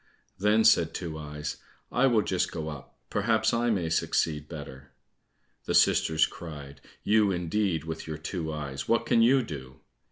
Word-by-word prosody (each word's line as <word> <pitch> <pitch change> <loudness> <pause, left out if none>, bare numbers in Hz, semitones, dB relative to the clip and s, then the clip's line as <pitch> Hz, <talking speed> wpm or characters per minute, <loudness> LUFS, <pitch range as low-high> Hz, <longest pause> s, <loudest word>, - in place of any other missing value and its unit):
Then 105 +3 +3
said 80 -5 +4
Two 80 -3 -5
eyes, 75 0 -5 0.3
"I 135 +2 +3
will 115 -5 +3
just 95 - -1
go 80 -1 -4
up, 75 -4 -10
perhaps 110 +1 +1
I 120 +1 +1
may 95 -7 0
succeed 75 -2 0
better." 70 -4 -9 0.7
The - - -1
sisters 80 -1 +4
cried, 70 -4 -9 0.2
"You 105 -1 +3
indeed, 90 -1 -1
with 80 0 -6
your 80 -1 -4
two 80 0 -4
eyes, 70 -3 -5
what 115 - +2
can 115 - +3
you 130 +3 +5
do?" 65 - -9
80 Hz, 160 wpm, -28 LUFS, 75-105 Hz, 0.7 s, you